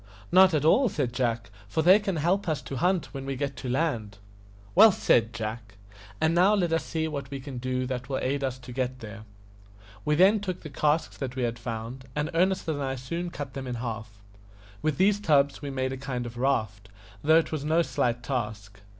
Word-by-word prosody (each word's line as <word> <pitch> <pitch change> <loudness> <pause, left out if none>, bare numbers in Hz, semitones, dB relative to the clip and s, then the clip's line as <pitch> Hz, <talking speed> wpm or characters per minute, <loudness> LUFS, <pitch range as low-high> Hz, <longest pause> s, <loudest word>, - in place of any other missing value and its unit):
"Not 185 -1 +6
at 150 -1 +1
all," 250 - +5
said 135 -9 -2
Jack, 115 -5 -1 0.2
"for 160 +10 0
they 185 +5 +7
can 195 -3 -2
help 175 +4 +1
us 155 -2 0
to 135 +1 -5
hunt 180 +4 0
when 135 -1 -5
we 135 0 -3
get 140 +1 -3
to 130 - -5
land." 120 -7 -1 0.6
"Well 215 +4 +8
said, 115 -10 +2
Jack. 110 -2 -6 0.4
And 160 +1 +2
now 185 +5 +5
let 175 -5 +1
us 165 - +1
see 160 -1 -2
what 140 -4 -5
we 140 -1 -5
can 130 -2 -7
do 130 0 -2
that 125 0 -4
will 135 - -1
aid 140 +2 -1
us 130 -1 -2
to 125 -1 -11
get 130 0 -2
there." 110 0 -9 0.8
We 150 - +1
then 195 +6 +5
took 185 -3 -4
the 155 - -9
casks 150 +3 0
that 130 -3 -4
we 130 - -1
had 120 0 -2
found, 115 +2 -6
and 150 +1 -1
Ernest 185 +2 +1
and 150 -3 -1
I 135 -1 -2
soon 170 +8 -4
cut 145 -5 -7
them 135 -1 -6
in 125 - -3
half. 110 -3 -6 0.6
With 155 -3 0
these 200 +3 +3
tubs 145 -7 +2
we 145 - -5
made 130 -1 -2
a - - -5
kind 130 -2 -4
of 120 0 -7
raft, 110 -6 -1 0.3
though 160 +2 +6
it 165 - +1
was 155 -3 -3
no 160 +3 +2
slight 125 -4 -1
task. 105 -6 -4
135 Hz, 220 wpm, -27 LUFS, 120-160 Hz, 0.8 s, Well